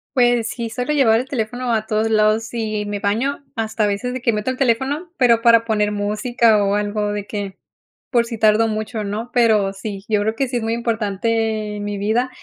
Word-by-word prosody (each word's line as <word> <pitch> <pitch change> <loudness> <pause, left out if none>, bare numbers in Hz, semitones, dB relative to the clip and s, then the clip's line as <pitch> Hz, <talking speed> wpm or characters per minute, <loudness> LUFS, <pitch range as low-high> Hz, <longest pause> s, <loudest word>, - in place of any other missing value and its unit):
Pues 240 -3 +3
sí, 235 -2 -4
suelo 250 +6 -2
llevar 230 -6 +4
el 255 - -4
teléfono 245 -1 -2
a 220 -1 -1
todos 220 +1 0
lados 215 +1 +2
y 215 -3 -2
me 205 0 -3
baño 235 +9 -1
hasta 220 -1 -1
a - - +2
veces 205 +5 -2
de 255 - -5
que 240 - +2
meto 210 +3 -1
el 255 - -6
teléfono, 270 +7 0
pero 235 -3 +4
para 230 -1 +5
poner 210 -2 +1
música 215 +1 +2
o 200 0 +1
algo 210 0 -1
de 205 -1 -4
que, 200 -2 -5 0.5
por 235 -2 +3
si 230 -1 -6
tardo 220 +1 +4
mucho, 215 0 -3
¿no?, 215 +4 -4
pero 215 -5 +3
sí, 195 0 -7
yo 210 -2 +2
creo 220 +2 -1
que 270 +3 0
sí 245 0 -2
es - - -2
muy 225 +1 -1
importante 220 -1 -1
en 205 - -5
mi 205 0 -3
vida 220 +5 0
220 Hz, 215 wpm, -20 LUFS, 210-240 Hz, 0.5 s, para